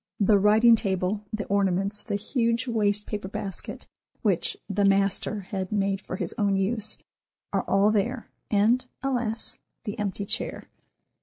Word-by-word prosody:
The 205 0 +5
writing 220 +4 +6
table, 195 -1 0
the 215 -1 -3
ornaments, 200 +1 0
the 205 - -3
huge 230 +3 0
waste 210 -3 +1
paper 205 -2 -4
basket, 195 -1 -5 0.4
which - - +1
"the 205 0 0
master" 195 +1 +2
had 190 -1 -4
made 195 -2 0
for - - -6
his - - -3
own 200 -2 +2
use, 210 +2 +2 0.6
are - - +2
all 200 +2 +4
there, 230 +4 -1 0.2
and, 220 +5 +3 0.2
alas, 240 -4 -1 0.2
the 215 0 -5
empty 200 -1 -2
chair! 225 +3 -2
205 Hz, 145 wpm, -26 LUFS, 195-220 Hz, 0.6 s, writing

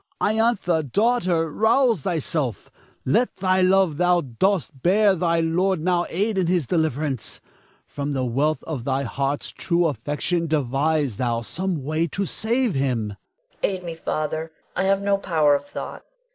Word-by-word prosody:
Iantha, 215 -6 +2
daughter, 175 - +1
rouse 230 - +3
thyself; 150 - -2 0.3
let 230 - +2
the 185 0 +1
love 185 -4 +3
thou 180 0 +3
dost 155 - -1
bear 200 +4 +4
thy 170 -2 +1
lord 180 +3 +1
now 175 +1 +1
aid 200 +3 0
in 180 - +1
his 175 -4 +1
deliverance. 150 -5 -1 0.5
From 145 0 -4
the 130 -2 -1
wealth 145 +6 0
of 145 -7 -5
thy 135 +1 0
heart's 140 +3 -2
true 175 -1 0
affection, 165 +3 -1
devise 145 -3 0
thou 120 -2 0
some 170 +4 -3
way 155 +4 0
to 195 +6 -2
save 235 +4 0
him. 130 -6 0
Iantha. - - -17 0.4
Aid 190 -2 -1
me, 170 -1 -5
Father; 160 0 -3 0.2
I 190 - 0
have 195 +1 +2
no 200 0 +2
power 155 -6 +3
of 140 0 0
thought. - - -7
165 Hz, 155 wpm, -23 LUFS, 145-190 Hz, 0.5 s, bear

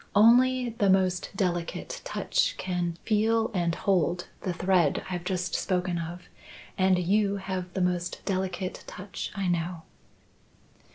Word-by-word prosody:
Only 250 +4 +5
the 210 -3 +1
most 185 -1 +2
delicate 175 -3 -2
touch - - 0
can 175 -2 -2
feel 225 +1 +2
and 170 -3 0
hold 175 -2 +1
the 185 - -2
thread 175 -3 +2
I've 175 -1 -3
just 180 0 -2
spoken 180 -2 0
of, 170 +2 -6 0.5
and 185 -1 +3
you 200 +3 +2
have 190 -2 -4
the 190 - 0
most 180 -1 -1
delicate 185 -1 -2
touch 185 +2 -6
I 195 -2 -1
know." 170 -1 -1
185 Hz, 130 wpm, -28 LUFS, 175-200 Hz, 0.5 s, Only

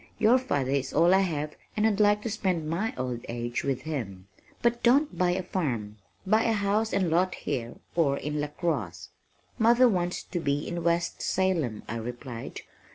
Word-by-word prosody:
Your 230 +4 +5
father 140 - -1
is 135 -1 -1
all 170 +4 +5
I 190 - +6
have 155 -5 -1 0.2
and 215 - +3
I'd 215 -2 +2
like 210 0 +4
to 230 - -2
spend 185 -7 -1
my 180 +8 -1
old 125 -2 -3
age 120 0 -3
with 135 -2 -1
him. 105 -12 -5 0.4
But 235 0 +2
don't 265 - +3
buy 180 +1 +2
a 185 +1 -2
farm. 120 - -2 0.3
Buy 215 +3 +4
a 225 - +3
house 210 +1 +1
and 190 -4 +1
lot 180 +3 +2
here 120 -5 -4 0.2
or 145 -5 +2
in 150 +1 -3
LaCrosse." 145 - -3 0.5
"Mother 240 +3 +6
wants 180 -5 0
to 175 - -4
be 145 -2 -1
in 170 -1 -3
West 170 0 0
Salem," 170 - 0
I 115 - -3
replied. 120 +1 -6
170 Hz, 180 wpm, -28 LUFS, 130-200 Hz, 0.5 s, I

